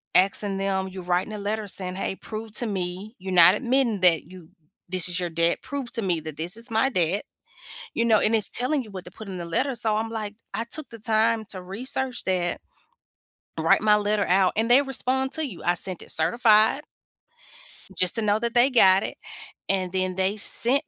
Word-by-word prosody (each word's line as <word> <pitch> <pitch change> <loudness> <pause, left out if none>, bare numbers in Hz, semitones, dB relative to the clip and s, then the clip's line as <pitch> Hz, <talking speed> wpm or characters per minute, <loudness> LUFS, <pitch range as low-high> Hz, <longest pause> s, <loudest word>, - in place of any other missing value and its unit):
asking 195 +1 +2
them 195 -1 -1
you 190 0 -8
writing 180 +4 -1
a 210 - -5
letter 210 +1 -3
saying, 185 -1 -2
"Hey, 190 0 -3
prove 220 +2 -8
to 240 - -2
me 190 +2 -5
you're 190 +1 -6
not 175 0 +7
admitting 245 -5 0
that 170 -4 +4
you 180 -3 -14 0.4
this 185 -2 +2
is 175 +1 0
your 175 - -2
debt. 170 +1 +1
Prove 275 -2 -5
to 230 - -1
me 180 -5 0
that 155 -1 -8
this 175 +6 -3
is 230 +2 -5
my 225 +4 +2
debt." 185 -3 0 0.7
You 230 - 0
know, 220 -2 +4
and 220 - +1
it's 220 -2 +3
telling 265 +3 0
you 220 - -13
what 185 -2 -8
to 180 - -11
put 215 +2 -11
in 190 - -6
the 175 - -5
letter, 255 +11 -1
so, 220 -1 0
I'm 225 +1 -2
like 215 -2 -5 0.2
I 225 - -2
took 275 +3 -6
the 230 - -11
time 220 0 +2
to 185 - -5
research 250 +6 -3
that, 180 -2 -1 1.0
write - - +3
my 210 -1 +4
letter 210 0 0
out, 185 0 +3
and 225 +2 0
they 255 +3 +7
respond 265 0 -1
to 315 0 -2
you. 185 - -11
I 175 - +2
sent 185 0 +2
it - - -11
certified 220 - +3 1.1
just 185 -1 +2
to 225 - +1
know 210 0 +1
that 235 0 -3
they 245 +2 +4
got 195 -7 +5
it, - - -6 0.5
and 185 -2 0
then 185 -1 -2
they 190 +3 -1
sent 265 +8 +5
210 Hz, 215 wpm, -24 LUFS, 185-230 Hz, 1.1 s, not